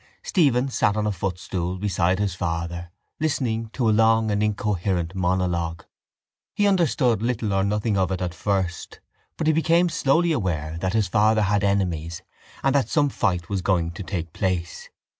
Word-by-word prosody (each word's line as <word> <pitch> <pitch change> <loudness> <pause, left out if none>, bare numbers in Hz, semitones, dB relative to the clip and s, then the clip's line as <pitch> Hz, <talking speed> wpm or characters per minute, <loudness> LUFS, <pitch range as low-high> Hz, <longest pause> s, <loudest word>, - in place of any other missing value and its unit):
Stephen 135 -7 +2
sat 110 -5 +1
on 105 - 0
a 105 - +1
footstool 90 -1 -3
beside 95 -2 +1
his 100 -2 -1
father 85 0 -3 0.3
listening 115 -7 -1
to 120 +1 -1
a - - +4
long 110 0 +3
and 105 0 0
incoherent 100 -5 -1
monologue. 90 -3 -1 0.7
He 205 - +2
understood 150 - +2
little 115 -3 -1
or 95 0 +2
nothing 105 0 0
of 95 0 +1
it 95 - -1
at 90 -2 -3
first 95 -3 -2 0.4
but 160 - -2
he 160 - +4
became 170 +2 +3
slowly 165 +1 +2
aware 80 - -2
that 95 +2 -1
his 110 -3 +2
father 110 +3 +3
had 100 0 +1
enemies 85 -5 -1 0.4
and 135 - +3
that 140 -2 +1
some 145 -2 +2
fight 90 -8 -1
was 100 -2 -2
going 85 -3 +1
to 85 - -8
take 85 -4 -4
place. 90 -4 -3
100 Hz, 170 wpm, -24 LUFS, 90-115 Hz, 0.7 s, a